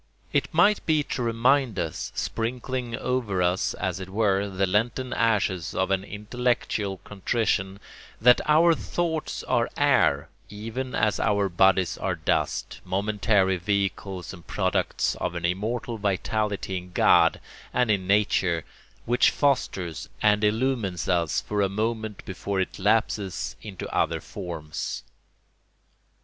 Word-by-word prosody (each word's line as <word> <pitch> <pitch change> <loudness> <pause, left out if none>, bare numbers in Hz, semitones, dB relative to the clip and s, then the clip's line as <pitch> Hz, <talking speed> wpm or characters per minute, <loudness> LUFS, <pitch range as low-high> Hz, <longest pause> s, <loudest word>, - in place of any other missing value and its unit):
It 140 -2 +1
might 190 +6 +4
be 155 -2 +3
to 135 - -4
remind 120 +1 +2
us, - - -3
sprinkling 120 +1 -3
over 115 -8 -1
us, 90 +1 +1
as 95 -2 -2
it 95 -1 -7
were, 100 -1 +1
the 95 0 0
Lenten 115 +6 0
ashes 95 -6 +1
of 95 +1 0
an 95 -1 +1
intellectual 105 -1 -2
contrition, 100 -1 -1 0.4
that 125 +2 +6
our 165 +3 +6
thoughts 160 -1 -2
are - - +1
air 70 0 +3 0.2
even 115 +5 -5
as 105 -1 +1
our 100 -1 +2
bodies 95 0 +3
are - - -1
dust, - - -1
momentary 100 0 +1
vehicles 95 0 -2
and 85 -4 -13
products - - 0
of - - -2
an 85 0 -2
immortal 110 +6 -2
vitality 100 0 -1
in 90 0 -9
God - - +5 0.3
and 125 -3 +2
in 95 -3 0
nature, 95 -4 +2 0.4
which 120 +1 +4
fosters 95 - -1
and 105 0 +3
illumines 105 - 0
us 85 -3 +1
for 105 -1 -2
a 100 - +2
moment 110 0 -3
before 95 +1 -3
it 95 - -2
lapses 105 -2 0
into 100 -4 -7
other - - +1
forms. 85 -5 -6
105 Hz, 130 wpm, -26 LUFS, 95-115 Hz, 0.4 s, that